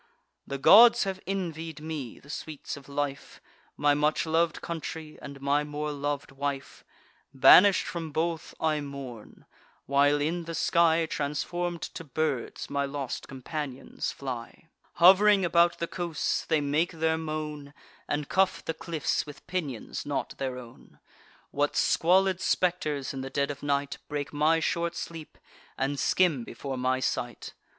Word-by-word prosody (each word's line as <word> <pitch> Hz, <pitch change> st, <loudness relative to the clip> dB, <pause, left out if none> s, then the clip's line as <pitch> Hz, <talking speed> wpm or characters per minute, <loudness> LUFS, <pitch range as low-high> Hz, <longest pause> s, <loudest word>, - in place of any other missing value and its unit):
The 140 Hz, -, -3 dB
gods 230 Hz, -, +8 dB
have 190 Hz, -2 st, -3 dB
envied 165 Hz, -5 st, -4 dB
me 150 Hz, -6 st, -6 dB
the 140 Hz, -, -12 dB
sweets 150 Hz, -1 st, -6 dB
of 140 Hz, 0 st, -13 dB
life, 140 Hz, -1 st, -4 dB, 0.4 s
My 145 Hz, 0 st, +4 dB
much 150 Hz, +3 st, +1 dB
lov'd 165 Hz, 0 st, +1 dB
country, 160 Hz, -1 st, -6 dB
and 140 Hz, -1 st, -9 dB
my 140 Hz, +2 st, +1 dB
more 150 Hz, 0 st, -4 dB
lov'd 145 Hz, 0 st, -3 dB
wife: 140 Hz, 0 st, -4 dB, 0.5 s
Banish'd 185 Hz, +9 st, +7 dB
from 165 Hz, -3 st, -5 dB
both, 160 Hz, +1 st, -2 dB
I 155 Hz, -2 st, +1 dB
mourn; 135 Hz, -6 st, -9 dB, 0.4 s
while 145 Hz, +1 st, +3 dB
in 165 Hz, +4 st, -1 dB
the 165 Hz, 0 st, -5 dB
sky, 165 Hz, -1 st, +3 dB
Transform'd 165 Hz, +4 st, -3 dB
to -, -, -6 dB
birds, 145 Hz, -3 st, -2 dB
my 140 Hz, 0 st, -1 dB
lost 140 Hz, -2 st, -4 dB
companions 135 Hz, 0 st, -5 dB
fly: 130 Hz, +3 st, -7 dB, 0.2 s
Hov'ring 195 Hz, +2 st, +6 dB
about 170 Hz, 0 st, +3 dB
the 170 Hz, -, -2 dB
coasts, 170 Hz, -2 st, -2 dB
they 160 Hz, -2 st, +1 dB
make 150 Hz, +5 st, 0 dB
their 160 Hz, 0 st, 0 dB
moan, 155 Hz, -2 st, -5 dB, 0.4 s
And 145 Hz, -1 st, -2 dB
cuff 190 Hz, 0 st, +1 dB
the 160 Hz, -, -1 dB
cliffs 160 Hz, -2 st, -2 dB
with 145 Hz, -, -11 dB
pinions 160 Hz, -10 st, -4 dB
not 145 Hz, -1 st, -3 dB
their 130 Hz, -2 st, -3 dB
own. 120 Hz, -2 st, -13 dB, 0.5 s
What 145 Hz, +1 st, 0 dB
squalid 185 Hz, +2 st, +3 dB
spectres, 155 Hz, -7 st, 0 dB
in 135 Hz, -, -5 dB
the 135 Hz, -, -5 dB
dead 140 Hz, +1 st, 0 dB
of 140 Hz, -, -9 dB
night, 140 Hz, -1 st, -1 dB
Break 145 Hz, -1 st, -4 dB
my 155 Hz, +3 st, +3 dB
short 170 Hz, 0 st, -1 dB
sleep, 165 Hz, -2 st, -7 dB, 0.4 s
and 135 Hz, +1 st, -1 dB
skim 165 Hz, -9 st, +2 dB
before 135 Hz, +4 st, -6 dB
my 130 Hz, +1 st, 0 dB
sight! 120 Hz, -2 st, -3 dB
150 Hz, 145 wpm, -28 LUFS, 140-170 Hz, 0.5 s, gods